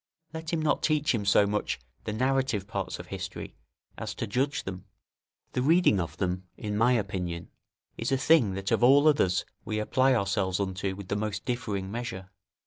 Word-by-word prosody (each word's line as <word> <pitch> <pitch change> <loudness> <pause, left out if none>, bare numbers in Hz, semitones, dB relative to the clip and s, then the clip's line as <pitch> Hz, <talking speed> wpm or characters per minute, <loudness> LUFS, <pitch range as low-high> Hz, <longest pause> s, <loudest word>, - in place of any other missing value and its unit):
Let 160 0 -5
him 165 -2 0
not 150 - +2
teach 150 -3 +2
him 105 -4 -1
so 100 +1 +5
much 105 -8 -1 0.3
the - - -2
narrative 130 -2 +1
parts 100 -4 -4
of - - -8
history - - -6 0.5
as - - -4
to - - -3
judge 135 +7 0
them; 95 -1 -6 0.7
the 125 - -1
reading 160 - +4
of 80 -2 -4
them, 90 -1 -2
in 105 -1 -3
my 115 +4 +4
opinion, 90 -6 -2 0.5
is 115 +3 -1
a 135 - +3
thing 130 -7 +4
that 95 -1 -3
of - - +2
all 140 +4 +7
others 95 -12 +3 0.2
we 110 - -3
apply 130 +5 +3
ourselves 100 -3 0
unto 95 0 -2
with 100 -1 -9
the - - 0
most 105 -1 -3
differing 105 -6 -2
measure. 100 -5 -5
105 Hz, 185 wpm, -28 LUFS, 95-130 Hz, 0.7 s, all